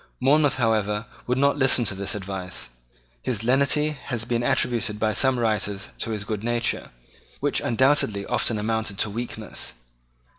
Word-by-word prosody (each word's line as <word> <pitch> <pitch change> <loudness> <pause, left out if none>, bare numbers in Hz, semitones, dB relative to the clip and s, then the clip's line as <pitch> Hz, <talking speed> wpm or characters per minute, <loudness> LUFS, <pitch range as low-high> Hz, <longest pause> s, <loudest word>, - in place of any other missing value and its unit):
Monmouth, 145 +2 +4
however, 110 -3 +1 0.2
would 125 +1 +1
not 140 +1 +3
listen 130 -3 +4
to 100 - 0
this 100 +1 -2
advice. 95 -2 -5 0.5
His 115 -4 -2
lenity 140 +5 +3
has 125 -6 -4
been 120 0 0
attributed 120 -3 0
by 110 0 +1
some 130 +6 +3
writers 105 -3 -1
to 115 - -2
his 105 -2 -2
good 105 0 -4
nature, 120 0 0 0.5
which - - +1
undoubtedly 120 -5 +2
often 115 - +1
amounted 110 -1 -1
to 105 - 0
weakness. 120 +3 -6
115 Hz, 150 wpm, -25 LUFS, 105-130 Hz, 0.5 s, Monmouth